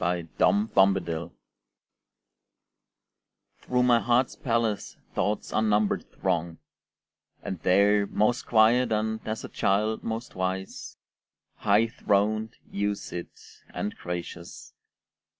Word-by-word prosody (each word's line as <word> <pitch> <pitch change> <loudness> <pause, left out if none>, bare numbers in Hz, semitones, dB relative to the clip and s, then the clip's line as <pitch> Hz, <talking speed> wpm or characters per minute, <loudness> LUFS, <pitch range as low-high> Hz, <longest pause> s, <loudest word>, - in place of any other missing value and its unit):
Day 85 -2 -1
and 105 +2 +2
Night 85 -4 +2 2.3
Through 125 0 0
my 120 -1 +5
heart's 120 +2 +1
palace 115 -4 -1 0.2
Thoughts 105 +1 -1
unnumbered 105 -1 +1
throng; 85 -3 -2 0.9
And 95 - -4
there, 100 +3 +3
most 120 +7 0
quiet 115 +2 +4
and, 110 0 0
as 110 0 -3
a - - -5
child, 105 +3 0
most 115 +2 -4
wise, 95 +1 -4 0.6
High 105 +3 +3
throned 110 -2 0 0.2
you 100 +1 0
sit, 90 -3 -8 0.4
and 105 - -3
gracious. 85 0 -7
105 Hz, 100 wpm, -27 LUFS, 95-110 Hz, 2.3 s, my